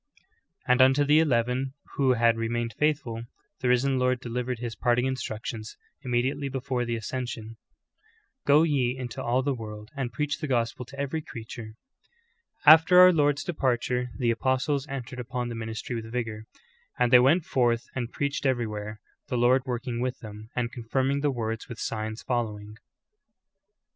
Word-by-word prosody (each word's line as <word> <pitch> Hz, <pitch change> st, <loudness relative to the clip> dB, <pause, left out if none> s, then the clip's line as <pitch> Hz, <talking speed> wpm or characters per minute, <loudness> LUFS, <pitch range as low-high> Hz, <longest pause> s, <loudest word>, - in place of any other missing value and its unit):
"' -, -, -37 dB
And 125 Hz, +1 st, +5 dB
unto 135 Hz, +2 st, +5 dB
the 150 Hz, +2 st, +5 dB
eleven 130 Hz, -2 st, +1 dB, 0.2 s
who 135 Hz, -2 st, +3 dB
had 115 Hz, -1 st, +3 dB
remained 115 Hz, 0 st, -2 dB
faithful, 140 Hz, -5 st, 0 dB, 0.4 s
the 125 Hz, -, -1 dB
Risen 130 Hz, +2 st, +2 dB
Lord 125 Hz, 0 st, +2 dB
delivered 125 Hz, 0 st, -3 dB
His 115 Hz, -1 st, -5 dB
parting 120 Hz, +3 st, +2 dB
instructions, 110 Hz, -4 st, -4 dB, 0.2 s
immediately 130 Hz, +3 st, -1 dB
before 130 Hz, -2 st, -2 dB
the 120 Hz, 0 st, -2 dB
ascension: 115 Hz, -1 st, -5 dB, 0.9 s
"Go 145 Hz, +2 st, +5 dB
ye 130 Hz, -5 st, +1 dB
in 125 Hz, -2 st, -5 dB
to -, -, -6 dB
all 125 Hz, +2 st, +1 dB
the 140 Hz, 0 st, 0 dB
world 105 Hz, -3 st, -8 dB
and 130 Hz, -3 st, -3 dB
j)reacli 145 Hz, +5 st, -2 dB
the 155 Hz, -, -3 dB
gospel 120 Hz, -1 st, -1 dB
to 140 Hz, +3 st, -12 dB
every 140 Hz, +3 st, -2 dB
creature." 115 Hz, -4 st, -9 dB, 0.9 s
After 160 Hz, +4 st, +8 dB
our 185 Hz, 0 st, +10 dB
Lcjrd's 145 Hz, -3 st, +2 dB
departure 125 Hz, -5 st, -1 dB
the 120 Hz, -3 st, +2 dB
apostles 130 Hz, +4 st, 0 dB
entered 135 Hz, -2 st, -6 dB
upon 125 Hz, 0 st, -3 dB
tlic 115 Hz, -, -5 dB
ministry 110 Hz, +2 st, -5 dB
with 115 Hz, -1 st, -6 dB
vigor: 115 Hz, -3 st, -4 dB, 0.5 s
"And 125 Hz, 0 st, +2 dB
they 125 Hz, -, +10 dB
went 155 Hz, +7 st, +4 dB
forth 120 Hz, -2 st, +1 dB
and 125 Hz, -2 st, -3 dB
preached 140 Hz, 0 st, -1 dB
everywhere, 110 Hz, -4 st, -2 dB, 0.3 s
the 125 Hz, -, -2 dB
Lord 125 Hz, +3 st, +3 dB
working 120 Hz, -1 st, -3 dB
with 125 Hz, 0 st, -2 dB
them, 110 Hz, 0 st, -10 dB
and 120 Hz, -1 st, -1 dB
confirming 130 Hz, +4 st, -1 dB
the 145 Hz, -, +2 dB
word 115 Hz, -4 st, -3 dB
with 120 Hz, -, -7 dB
signs 110 Hz, 0 st, -4 dB
following." 105 Hz, -4 st, -3 dB
125 Hz, 165 wpm, -27 LUFS, 115-135 Hz, 0.9 s, our